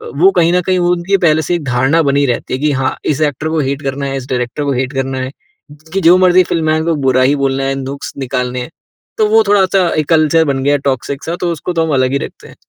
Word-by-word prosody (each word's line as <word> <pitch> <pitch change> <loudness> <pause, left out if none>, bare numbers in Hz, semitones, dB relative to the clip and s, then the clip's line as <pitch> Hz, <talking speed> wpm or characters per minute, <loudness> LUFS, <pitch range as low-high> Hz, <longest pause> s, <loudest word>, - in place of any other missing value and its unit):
वो 385 - +4
कहीं 170 - +2
न 180 - +2
कहीं 185 +1 0
उनकी 175 +2 +1
पहले 160 -4 +2
से 175 +3 -1
एक 170 - -4
धारणा 130 +5 +2
बनी 140 0 +2
रहती 125 -1 -2
है 130 - -2
कि 150 +1 +1
हाँ, 135 -1 -1
इस 150 0 -1
एक्टर 150 0 -1
को 160 - -1
हेट 140 +1 -2
करना 140 0 -3
है, 135 0 -3
इस 130 -1 -7
डायरेक्टर 125 +3 -2
को 140 - -1
हेट 130 +2 -2
करना 135 0 -2
है 130 0 -4 0.6
कि 195 - 0
जो 175 +1 +6
मर्ज़ी 185 0 +5
फ़िल्में 160 -2 0
आएँ 155 - +1
उन 160 - -4
को 165 - +1
बुरा 130 -1 +2
ही 140 +3 +3
बोलना 135 -1 -1
है 135 0 -1
नुक्स 135 +1 -6
निकालने 125 -2 -3
हैं 125 - -7 0.5
तो 215 - +3
वो 220 +1 +4
थोड़ा-सा 190 -2 +3
एक 155 - 0
कल्चर 160 0 +3
बन 135 -2 -1
गया 145 +1 +2
टॉक्सिक 135 +1 -4
सा 170 +1 -3
तो 175 - 0
उसको 170 +2 -4
तो 165 -1 +1
हम 155 - -2
अलग 130 0 +1
ही 140 - +1
रखते - - -9
हैं। - - -15
145 Hz, 270 wpm, -14 LUFS, 135-170 Hz, 0.6 s, जो